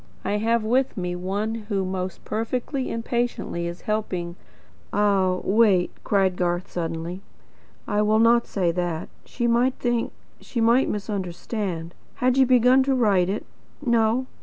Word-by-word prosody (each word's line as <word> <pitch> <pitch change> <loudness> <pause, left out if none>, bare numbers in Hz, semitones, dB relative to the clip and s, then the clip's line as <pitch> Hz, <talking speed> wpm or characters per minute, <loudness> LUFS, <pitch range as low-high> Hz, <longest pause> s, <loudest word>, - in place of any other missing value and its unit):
I 205 - 0
have 230 +1 +1
with 250 +3 +1
me 180 -1 -2
one 200 +5 -2 0.2
who 195 -3 0
most 185 0 -4
perfectly 250 +5 -2
and 230 0 -4
patiently 235 -8 -2
is 170 +1 -7
helping 185 -5 -2 0.6
Ah, 195 -3 +2
wait!" 200 -3 +3
cried 190 -3 +2
Garth 175 0 -1
suddenly. 165 +2 -4 0.7
"I 205 - +1
will 215 +1 +3
not 235 +1 +4
say 180 -4 0
that. 175 -2 -3 0.2
She 240 - -3
might 240 +2 +3
think 240 -1 -1 0.3
she 240 - -5
might 235 +3 +4
misunderstand. 190 -3 -4 0.2
Had 255 0 +2
you 265 -1 +5
begun 250 +1 +5
to 270 0 +1
write 200 -7 +3
it? 205 - -3 0.4
No? 235 +1 +2
210 Hz, 145 wpm, -24 LUFS, 180-235 Hz, 0.7 s, you